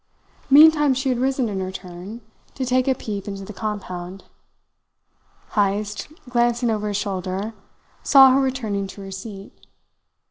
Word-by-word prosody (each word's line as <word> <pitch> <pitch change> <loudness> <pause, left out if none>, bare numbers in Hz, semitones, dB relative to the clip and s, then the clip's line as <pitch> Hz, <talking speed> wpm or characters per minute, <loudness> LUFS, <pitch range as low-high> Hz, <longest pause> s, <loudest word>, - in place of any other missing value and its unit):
Meantime 295 -1 +7
she 265 +1 -1
had 250 -2 0
risen 260 -1 0
in 200 -3 -3
her 185 0 -3
turn, 185 +5 -9 0.3
to 265 - -2
take 255 +1 +1
a 265 - +3
peep 205 -5 -6
into 195 -1 -6
the 215 - -9
compound. 190 -3 -6 1.3
Heyst, 205 0 -1 0.2
glancing 240 -1 +1
over 210 -1 -2
his 205 -1 -1
shoulder, 195 +1 -3 0.5
saw 270 -2 +7
her 270 +1 +3
returning 225 -7 -2
to 200 - -11
her 195 - -8
seat. 195 0 -9
210 Hz, 145 wpm, -22 LUFS, 195-255 Hz, 1.3 s, Meantime